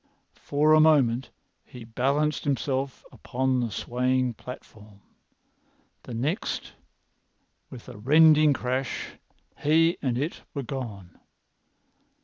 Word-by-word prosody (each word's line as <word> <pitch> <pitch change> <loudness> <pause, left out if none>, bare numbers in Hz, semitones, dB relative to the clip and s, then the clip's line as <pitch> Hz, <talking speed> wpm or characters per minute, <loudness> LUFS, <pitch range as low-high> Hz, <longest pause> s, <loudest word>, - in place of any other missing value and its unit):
For 150 +2 +2
a 155 - +6
moment 135 -6 +3 0.3
he 125 - -12
balanced 140 +7 0
himself 135 -1 -2
upon 130 0 -1
the 120 -2 -1
swaying 125 +3 -1
platform. 110 -4 -12 1.0
The 120 - -8
next, 150 - -3 1.0
with 125 -4 -11
a 125 - -10
rending 155 +4 +5
crash, 130 -1 -2 0.5
he 165 +4 +3
and 125 -3 -1
it 150 +6 -3
were 140 - -3
gone. 110 -9 -7
130 Hz, 105 wpm, -26 LUFS, 120-150 Hz, 1.0 s, a